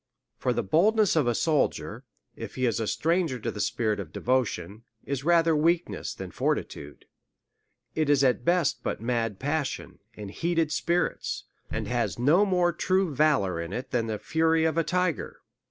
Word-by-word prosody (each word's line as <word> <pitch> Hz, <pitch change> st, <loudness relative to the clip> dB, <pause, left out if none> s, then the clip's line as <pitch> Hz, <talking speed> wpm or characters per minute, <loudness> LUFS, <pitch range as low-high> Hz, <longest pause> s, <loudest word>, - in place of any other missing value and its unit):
For 125 Hz, -, 0 dB
the 120 Hz, -1 st, -1 dB
boldness 205 Hz, -, +3 dB
of 150 Hz, -6 st, +2 dB
a 120 Hz, -, +1 dB
soldier, 155 Hz, +1 st, 0 dB, 0.3 s
if -, -, -8 dB
he 130 Hz, -, 0 dB
is 115 Hz, -1 st, 0 dB
a 110 Hz, -, -2 dB
stranger 165 Hz, -, 0 dB
to -, -, -3 dB
the 105 Hz, -, -8 dB
spirit 110 Hz, -3 st, 0 dB
of 90 Hz, -6 st, -6 dB
devotion, 115 Hz, -5 st, -1 dB, 0.2 s
is 140 Hz, -1 st, -3 dB
rather 165 Hz, 0 st, +4 dB
weakness 165 Hz, +3 st, 0 dB
than -, -, -7 dB
fortitude; 70 Hz, 0 st, -3 dB, 0.9 s
it 155 Hz, -2 st, 0 dB
is 140 Hz, -1 st, +4 dB
at 130 Hz, -2 st, +2 dB
best 175 Hz, -3 st, +1 dB
but -, -, -3 dB
mad 115 Hz, -3 st, -1 dB
passion, 145 Hz, +2 st, -3 dB, 0.2 s
and 105 Hz, -2 st, -8 dB
heated 165 Hz, +4 st, 0 dB
spirits, 170 Hz, +2 st, -1 dB, 0.3 s
and -, -, -3 dB
has -, -, -1 dB
no 160 Hz, +12 st, +4 dB
more 180 Hz, -2 st, +2 dB
true 185 Hz, -1 st, +1 dB
valour 130 Hz, -, +2 dB
in 85 Hz, +3 st, -6 dB
it 125 Hz, +3 st, -5 dB
than 115 Hz, -2 st, 0 dB
the 110 Hz, -1 st, -2 dB
fury 160 Hz, +4 st, +1 dB
of 160 Hz, -1 st, +1 dB
a 165 Hz, -, +2 dB
tiger. 180 Hz, +1 st, -1 dB
150 Hz, 170 wpm, -27 LUFS, 120-165 Hz, 0.9 s, rather